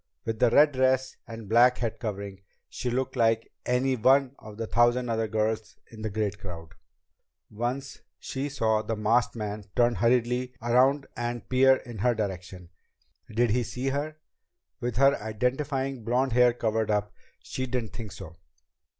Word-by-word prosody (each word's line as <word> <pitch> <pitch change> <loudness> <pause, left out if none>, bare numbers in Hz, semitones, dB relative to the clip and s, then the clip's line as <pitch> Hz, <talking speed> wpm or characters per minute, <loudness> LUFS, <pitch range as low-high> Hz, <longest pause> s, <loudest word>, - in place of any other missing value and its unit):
With 115 -1 -3
the 125 - +5
red 145 +4 +6
dress 130 0 +1
and 115 -2 -8
black 120 +4 +5
head 115 -3 -3
covering, 100 -3 -5 0.3
she 125 - -4
looked 130 +2 -2
like 115 -2 +1 0.2
any 130 +2 +2
one 130 +3 +3
of 105 -1 -11
the 115 - -3
thousand 120 +2 +2
other 115 -1 0
girls 110 0 -2
in 110 -1 -11
the 110 - -2
great 105 -1 -2
crowd. 85 -4 -8 0.8
Once 125 +5 -4 0.2
she 135 +2 -4
saw 110 -6 +1
the 110 +1 -3
masked 110 +4 +1
man 105 -2 -5
turn 120 -1 +4
hurriedly 125 +3 +1
around 130 +4 +3
and 120 0 -4
peer 130 +1 +5
in 120 -4 -9
her 120 +3 +2
direction. 95 -4 -5 0.6
Did 115 +1 +2
he 125 +3 +2
see 125 +3 -3
her? 145 +3 -3 0.6
With 120 -3 -3
her 135 -1 +4
identifying 130 +4 -2
blond 125 +3 +1
hair 125 +1 +5
covered 110 -2 -1
up, 105 -1 0 0.3
she 130 0 -4
didn't 120 -3 -3
think 110 -4 -7
so. 85 -3 -10
120 Hz, 160 wpm, -27 LUFS, 110-130 Hz, 0.8 s, red